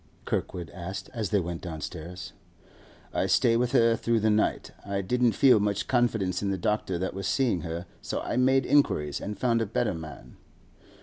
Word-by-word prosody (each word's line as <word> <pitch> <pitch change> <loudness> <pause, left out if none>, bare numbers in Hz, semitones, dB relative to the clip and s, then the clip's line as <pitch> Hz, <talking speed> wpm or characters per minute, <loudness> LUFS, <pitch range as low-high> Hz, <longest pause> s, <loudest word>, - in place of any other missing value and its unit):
Kirkwood 90 -2 -3
asked 90 +2 -7
as 110 -5 -2
they 105 - +2
went 85 -1 -4
downstairs. 85 +1 -7 0.8
'I - - +1
stay 115 - +3
with 120 +1 +1
her 115 0 +5
through 115 0 +1
the 110 0 +2
night. 105 0 0
I 100 -1 -2
didn't 120 +4 +2
feel 130 -5 +5
much 100 -1 -1
confidence 110 -8 +1
in 100 - -1
the 95 - -1
doctor 105 -3 -1
that 95 +2 -3
was 95 0 -4
seeing 95 -2 +1
her, 85 +2 -5 0.2
so - - -3
I - - -3
made 130 +1 +3
inquiries 75 - +2
and 105 0 -5
found 115 0 +1
a 115 - -1
better 100 - 0
man. 80 -6 -9
100 Hz, 185 wpm, -27 LUFS, 90-115 Hz, 0.8 s, her